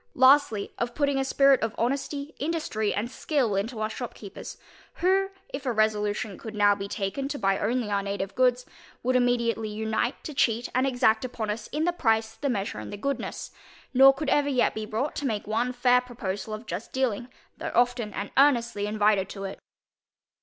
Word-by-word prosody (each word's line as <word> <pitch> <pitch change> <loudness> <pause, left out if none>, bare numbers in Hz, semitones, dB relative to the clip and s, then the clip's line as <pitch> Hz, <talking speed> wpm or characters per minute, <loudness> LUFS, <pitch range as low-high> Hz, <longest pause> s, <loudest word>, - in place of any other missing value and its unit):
Lastly, 260 -6 +4
of 240 0 -2
putting 285 -2 +1
a - - +1
spirit 275 0 +4
of 225 0 -2
honesty, 280 +4 -2
industry, 285 -9 -1
and 230 +4 -2
skill 260 -8 0
into 215 +4 -2
our 215 0 -1
shopkeepers, 220 -4 -8 0.4
who, 385 +2 +2 0.2
if 270 0 -6
a 255 - 0
resolution 210 -2 0
could 220 -1 -8
now 205 -1 +5
be 200 0 -5
taken 200 +8 -3
to 285 - -4
buy 195 -4 +1
only 230 0 -1
our 200 -1 +1
native 200 -1 -3
goods, 250 +1 +2 0.4
would 255 +1 +1
immediately 235 -3 +1
unite 220 +3 -2
to 305 - -6
cheat 235 -3 +1
and 255 +2 +2
exact 245 -4 +2
upon 230 -4 -3
us 215 +1 -5
in 305 +2 -2
the 350 +1 +1
price, 225 -7 +1
the 280 +4 -3
measure, 205 -3 -2
and - - -7
the 205 - -6
goodness, 275 +7 -4 0.4
nor 270 +1 +8
could 275 +1 -3
ever 290 -1 +3
yet 255 -3 +2
be 215 0 -5
brought 235 +8 -2
to 285 - -1
make 215 -4 -2
one 230 +4 0
fair 250 0 +3
proposal 220 -5 -5
of 215 +2 -6
just 215 0 -6
dealing, 245 -3 -1 0.3
though - - -3
often 245 -2 +2
and 200 0 -5
earnestly 235 -7 +3
invited 210 -2 +2
to 195 - -7
it. 195 0 -6
235 Hz, 190 wpm, -27 LUFS, 210-265 Hz, 0.4 s, nor